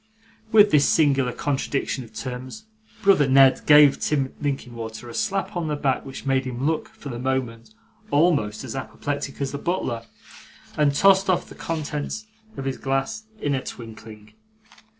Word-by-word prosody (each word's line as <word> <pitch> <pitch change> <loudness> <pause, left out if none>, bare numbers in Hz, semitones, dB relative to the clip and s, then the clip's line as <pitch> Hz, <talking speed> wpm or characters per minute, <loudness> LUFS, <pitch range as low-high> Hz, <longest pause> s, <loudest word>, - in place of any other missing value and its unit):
With 210 -1 +6
this 145 -2 +4
singular 140 -5 +3
contradiction 135 0 -2
of 115 - -14
terms, 130 - -7 0.4
brother 190 -8 +5
Ned 135 -1 +6
gave 150 -2 +7
Tim 135 -3 -1
Linkinwater 120 -5 -4
a - - -9
slap 195 - -2
on 170 -2 -2
the 150 - -1
back, 135 -3 0
which 135 0 -9
made 135 -1 +1
him 130 +1 -4
look, 160 +1 0
for 140 - -10
the 120 -2 -5
moment, 130 - -3 0.3
almost 145 - +2
as - - -6
apoplectic 140 +1 -4
as 140 -1 -2
the 140 - -5
butler: 170 -10 -2 0.7
and 145 -2 +2
tossed 195 +2 +5
off 185 - +1
the - - -12
contents 155 +5 -4 0.3
of 135 - -5
his 135 -1 -3
glass 135 +12 -2
in 145 - -1
a 130 - -1
twinkling. 110 -2 -10
140 Hz, 160 wpm, -24 LUFS, 130-155 Hz, 0.7 s, gave